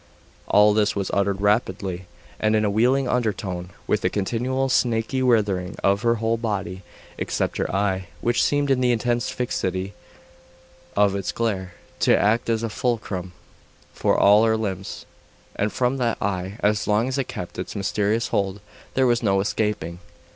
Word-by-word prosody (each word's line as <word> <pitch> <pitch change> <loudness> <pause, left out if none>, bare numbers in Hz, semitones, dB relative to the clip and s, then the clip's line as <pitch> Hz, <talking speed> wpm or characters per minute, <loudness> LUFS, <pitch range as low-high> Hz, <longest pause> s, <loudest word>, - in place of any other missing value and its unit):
All 105 0 +5
this 105 -1 +2
was 100 -2 -2
uttered 100 0 +1
rapidly, 95 -3 0 0.3
and 110 0 +2
in 110 0 +2
a 100 - +1
wheedling 125 +5 +2
undertone, 100 -7 -2 0.2
with - - 0
a - - +3
continual 125 +6 -1
snaky 120 0 +1
writhing 105 -8 +1
of 100 +1 +3
her 115 0 +2
whole 115 +1 0
body, 100 -5 -3 0.4
except - - -1
her - - -1
eye, 95 -1 0
which 120 0 +1
seemed, 145 -1 +2
in 130 -1 +2
the 125 -1 +3
intense 120 0 0
fixity 95 -5 -2 1.0
of 100 -1 +3
its 100 -2 -2
glare, 95 -6 -2 0.2
to - - +4
act 115 +3 +2
as 115 0 +1
a 115 - -1
fulcrum 105 -6 -2 0.6
for - - +1
all 105 +2 +6
her 110 -1 +3
limbs; 100 -3 -4 0.5
and 105 +1 0
from 125 +1 0
that 120 -3 0
eye, 95 0 -2
as 105 0 +1
long 105 +3 +2
as 130 +1 -2
it 135 - -1
kept 90 0 -7
its 90 - -5
mysterious 105 +3 0
hold, 100 0 -1 0.4
there 130 - +3
was 120 -1 +2
no 100 -4 +2
escaping. 95 -4 -2
105 Hz, 165 wpm, -23 LUFS, 95-120 Hz, 1.0 s, all